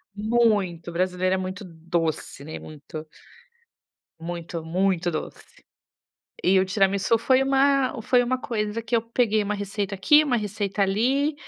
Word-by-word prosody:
muito, 210 -6 +1
o - - -8
brasileiro 185 +1 0
é - - -1
muito 185 +3 -5
doce, 165 -3 -3
né, 155 - -7
muito 155 +1 -9 1.1
muito, 170 0 -6
muito 180 +1 0
doce, 155 - -6 1.0
e 190 +1 +4
o - - +2
tiramisu 195 +3 +2
foi 260 +3 +3
uma 270 -2 +2
foi 250 +1 +3
uma 255 +1 -1
coisa 215 -1 -3
que 225 +1 -3
eu 225 - +1
peguei 230 -2 +1
uma 210 +1 -2
receita 200 0 -3
aqui, 295 +11 +5
uma 255 -4 +1
receita 205 -2 -2
ali, 260 +10 +1
200 Hz, 145 wpm, -24 LUFS, 180-230 Hz, 1.1 s, aqui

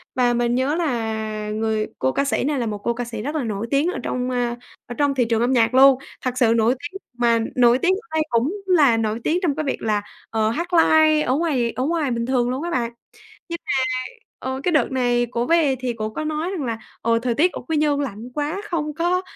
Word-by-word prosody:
Và 245 -1 +3
mình 240 0 +1
nhớ 265 +4 +1
là 220 -8 -2
người 215 0 -1
cô 130 - +1
ca 280 - 0
sĩ 275 - 0
này 285 0 0
là 240 - -1
một 210 -2 -3
cô 235 +3 -1
ca 245 +1 -4
sĩ 230 -2 -6
rất 290 +7 -4
là 300 - 0
nổi 220 -1 -3
tiếng 280 +3 +2
ở - - -5
trong, 250 0 -2
ờ, 245 -1 -1 0.3
ở 240 - -7
trong 285 -1 +1
thị 250 -2 +2
trường 225 -1 0
âm 240 +2 +2
nhạc 230 -1 +3
luôn, 265 0 +7 0.2
thật 255 -1 -3
sự 235 -3 +4
nổi 230 +2 +3
tiếng 295 +8 -7
mà 235 -1 +2 0.2
nổi 245 -1 +5
tiếng 365 +5 +3
ở 450 - -26
đây 315 - +3
cũng 235 +8 +1
là 300 -11 +4
nổi 220 0 -1
tiếng 340 +3 +1
trong 320 -7 +1
cái 310 - -2
việc 275 - -2
là, 210 -2 0 0.3
ờ, 220 -1 +1
hát 335 +10 -2
live 315 -2 +5
ở 255 -3 +1
ngoài 275 -7 0
ở 255 - -3
ngoài 305 -2 0
bình 235 -1 -1
thường 245 -1 +1
luôn 260 +4 -3
á 345 - -3
bạn. 235 -5 -1 0.6
Nhưng 340 0 -4
mà, - - -1 0.7
ờ, 260 0 -4
cái 355 - +1
đợt 305 - +2
này 245 -2 +1
cổ 240 0 -1
về 315 -4 +3
thì 255 -1 -1
cổ 215 -2 -4
có 310 +8 -4
nói 310 +3 -2
rằng 355 -8 -3
là 230 -2 -3 0.2
"Ồ, 230 0 +2
thời 235 0 -1
tiết 345 +8 +3
ở - - -6
Quy 320 - 0
Nhơn 295 -1 +2
lạnh 235 -4 -5
quá, 300 +6 -2
không 305 -6 -3
có 350 +3 +1
255 Hz, 250 wpm, -22 LUFS, 230-305 Hz, 0.7 s, luôn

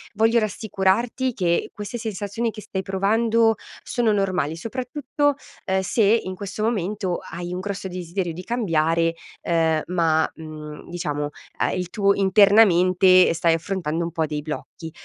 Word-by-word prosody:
voglio 225 +2 +4
rassicurarti 220 +4 0
che 170 -4 0
queste 210 +3 -6
sensazioni 220 +1 -3
che 215 - -9
stai 190 -2 -4
provando 225 +4 +2 0.3
sono 240 -3 +1
normali, 180 -6 0
soprattutto, 260 - -1 0.3
ehm, 190 0 +1
se 215 +4 +1
in 200 -3 +2
questo 200 +2 -5
momento 200 -4 -1
hai 175 +1 -5
un 180 - -3
grosso 195 -1 -4
desiderio 180 -1 -4
di 180 +3 -8
cambiare, 165 -7 +1 0.3
ehm, 160 -2 +1
ma, 165 -3 +2
mhmm, 155 -1 -9
diciamo 150 -4 -3 0.4
il 180 -1 -3
tu 200 +1 +2
internamente 190 -3 +5
stai 170 0 +2
affrontando 170 -1 -2
un 170 - -4
po' 160 -1 0
dei 150 -1 -4
blocchi. 160 +1 -7
190 Hz, 140 wpm, -23 LUFS, 170-215 Hz, 0.4 s, internamente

